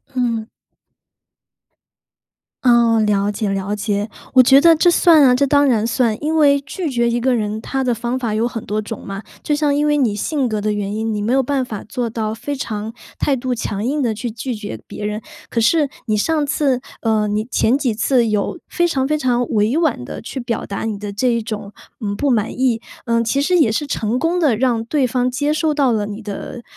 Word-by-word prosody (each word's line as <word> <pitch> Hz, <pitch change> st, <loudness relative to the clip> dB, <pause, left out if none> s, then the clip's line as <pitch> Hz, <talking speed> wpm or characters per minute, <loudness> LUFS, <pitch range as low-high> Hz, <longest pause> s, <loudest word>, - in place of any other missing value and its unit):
嗯。 230 Hz, -3 st, -1 dB, 2.2 s
哦， 235 Hz, -2 st, +4 dB
了 205 Hz, -1 st, +1 dB
解 210 Hz, +1 st, -2 dB
了 195 Hz, +1 st, -2 dB
解， 205 Hz, 0 st, -2 dB, 0.2 s
我 260 Hz, -, +8 dB
觉 265 Hz, +2 st, +6 dB
得 330 Hz, +2 st, +6 dB
这 350 Hz, +3 st, +4 dB
算 335 Hz, -3 st, +6 dB
啊， 250 Hz, -2 st, +6 dB
这 280 Hz, +3 st, +2 dB
当 285 Hz, +1 st, +3 dB
然 225 Hz, -4 st, +2 dB
算。 230 Hz, -2 st, +1 dB
因 310 Hz, +2 st, 0 dB
为 285 Hz, -2 st, +5 dB
拒 310 Hz, +4 st, -4 dB
绝 240 Hz, -3 st, +1 dB
一 235 Hz, +1 st, 0 dB
个 250 Hz, +1 st, +2 dB
人， 215 Hz, -1 st, -2 dB
它 270 Hz, +3 st, -2 dB
的 250 Hz, -2 st, +1 dB
方 240 Hz, +2 st, -2 dB
法 235 Hz, -4 st, -2 dB
有 220 Hz, +2 st, +1 dB
很 230 Hz, -2 st, -6 dB
多 210 Hz, +1 st, -1 dB
种 215 Hz, +1 st, -7 dB
嘛， 195 Hz, 0 st, -5 dB, 0.2 s
就 295 Hz, -, +1 dB
像 295 Hz, -1 st, +1 dB
因 295 Hz, +1 st, +1 dB
为 295 Hz, 0 st, +3 dB
你 245 Hz, -8 st, +1 dB
性 270 Hz, +4 st, -1 dB
格 215 Hz, -1 st, -1 dB
的 210 Hz, 0 st, -1 dB
原 205 Hz, -1 st, -3 dB
因， 220 Hz, +1 st, -2 dB
你 210 Hz, -, -2 dB
没 215 Hz, +3 st, -1 dB
有 270 Hz, 0 st, +3 dB
办 270 Hz, +1 st, 0 dB
法 220 Hz, -5 st, -6 dB
做 245 Hz, -1 st, -2 dB
到 220 Hz, -1 st, -3 dB
非 255 Hz, +6 st, -4 dB
常 220 Hz, -4 st, -4 dB, 0.3 s
态 280 Hz, -, +2 dB
度 255 Hz, 0 st, -2 dB
强 215 Hz, -3 st, -3 dB
硬 290 Hz, +4 st, 0 dB
地 235 Hz, -4 st, +1 dB
去 230 Hz, +2 st, -4 dB
拒 240 Hz, +3 st, -4 dB
绝 205 Hz, -, -7 dB
别 210 Hz, -, -6 dB
人， 210 Hz, +1 st, -3 dB, 0.3 s
可 230 Hz, -, 0 dB
是 295 Hz, +6 st, +3 dB, 0.2 s
你 215 Hz, -1 st, +1 dB
上 310 Hz, +7 st, +1 dB
次 275 Hz, -4 st, +1 dB, 0.2 s
呃， 220 Hz, -2 st, +1 dB
你 210 Hz, +1 st, -1 dB
前 245 Hz, +5 st, +2 dB
几 265 Hz, -5 st, 0 dB
次 240 Hz, +2 st, +2 dB
有 210 Hz, -, -1 dB
非 345 Hz, 0 st, +1 dB
常 265 Hz, -5 st, 0 dB
非 305 Hz, +1 st, +1 dB
常 245 Hz, -3 st, +1 dB
委 215 Hz, +6 st, +1 dB
婉 310 Hz, -, +1 dB
地 -, -, -7 dB
去 260 Hz, -, -6 dB
表 235 Hz, -2 st, -3 dB
达 200 Hz, -, -5 dB
你 215 Hz, -2 st, -2 dB
的 205 Hz, 0 st, -6 dB
这 235 Hz, +6 st, 0 dB
一 235 Hz, -1 st, +1 dB
种， 215 Hz, -2 st, -6 dB, 0.3 s
嗯， 205 Hz, -2 st, -2 dB
不 285 Hz, +7 st, 0 dB
满 220 Hz, -3 st, +1 dB
意， 245 Hz, -4 st, +2 dB, 0.2 s
呃， 230 Hz, -1 st, +2 dB
其 250 Hz, +5 st, 0 dB
实 360 Hz, +5 st, +2 dB
也 275 Hz, -9 st, +4 dB
是 295 Hz, +7 st, -1 dB
成 230 Hz, -4 st, -1 dB
功 330 Hz, +6 st, 0 dB
的 285 Hz, -10 st, +2 dB
让 240 Hz, -2 st, +1 dB
对 280 Hz, +1 st, +1 dB
方 250 Hz, +1 st, 0 dB
接 290 Hz, +4 st, 0 dB
受 310 Hz, 0 st, +1 dB
到 275 Hz, -4 st, +3 dB
了 210 Hz, -2 st, 0 dB
你 210 Hz, +2 st, -7 dB
的 215 Hz, +4 st, -7 dB
235 Hz, 240 characters per minute, -19 LUFS, 215-275 Hz, 2.2 s, 我